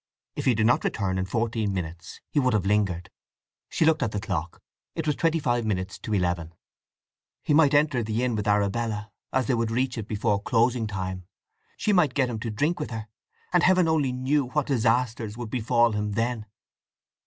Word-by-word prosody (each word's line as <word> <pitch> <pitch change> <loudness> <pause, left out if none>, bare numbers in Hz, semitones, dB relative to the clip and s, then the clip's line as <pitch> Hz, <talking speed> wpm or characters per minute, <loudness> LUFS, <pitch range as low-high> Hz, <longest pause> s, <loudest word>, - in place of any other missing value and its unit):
If - - -4
he 125 - +4
did 110 0 +2
not 125 +2 +3
return 95 -3 -1
in 95 - -1
fourteen 110 -1 -1
minutes 85 -2 -6
he 150 - +2
would 130 -2 +2
have 100 -3 0
lingered. 95 -4 0 0.6
She 160 - +1
looked 160 -1 +3
at 115 -5 0
the 105 - -2
clock. 90 -6 -4 0.4
It 160 - -3
was 150 -2 +1
twenty 165 0 +1
five 120 -6 0
minutes 95 -3 -2
to 110 - -4
eleven. 85 -3 -1 0.9
He 150 - +1
might 150 -2 +5
enter 145 -4 +3
the 110 +2 -1
inn 125 -2 0
with 105 0 -2
Arabella, 105 +1 0 0.2
as 130 -1 +1
they 130 - +1
would 115 -1 0
reach 125 +1 -1
it 110 - -6
before 105 -2 0
closing 120 +1 +1
time; 95 -2 -5 0.5
she 210 - +1
might 160 -9 +3
get 130 -3 +2
him 110 - -4
to 115 - -4
drink 150 +11 0
with - - -3
her; 110 -2 -6 0.4
and 180 - +5
Heaven 185 -1 +4
only 155 -5 +2
knew 130 +3 +1
what 140 +3 -1
disasters 120 -3 0
would 120 -3 -6
befall 120 -1 +2
him 105 -1 -2
then. 115 0 -1
115 Hz, 200 wpm, -26 LUFS, 105-130 Hz, 0.9 s, might